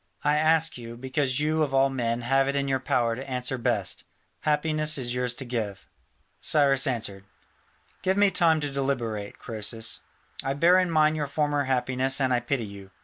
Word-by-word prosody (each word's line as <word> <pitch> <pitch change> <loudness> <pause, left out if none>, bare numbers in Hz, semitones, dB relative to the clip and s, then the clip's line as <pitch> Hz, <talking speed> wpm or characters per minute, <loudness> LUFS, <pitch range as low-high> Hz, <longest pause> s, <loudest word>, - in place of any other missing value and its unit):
I 150 +1 +3
ask 160 -2 +3
you, 115 0 -9
because 130 +1 -1
you 155 +1 +1
of 140 -3 0
all 135 0 +4
men 120 -2 -1
have 135 +3 +2
it 140 - -1
in 140 0 0
your 135 -1 +1
power 125 -4 0
to 135 +3 -8
answer 125 0 -3
best. - - -1 0.4
Happiness 155 0 +1
is 120 -2 -2
yours 125 -1 0
to 135 - -3
give." 105 -5 -4 0.5
Cyrus 140 -2 +3
answered, 110 -6 -2 0.8
"Give 190 +1 +1
me 205 -1 +4
time 165 -3 +4
to 145 -1 -2
deliberate, 120 -7 -3
Croesus. 110 0 -3 0.4
I 135 +1 -1
bear 175 +5 +5
in 185 -1 +1
mind 155 -1 +3
your 145 -2 -2
former 145 0 0
happiness 130 +1 0
and 130 -2 +2
I 125 - +3
pity 120 -1 -2
you. 100 -1 -11
135 Hz, 185 wpm, -26 LUFS, 120-150 Hz, 0.8 s, bear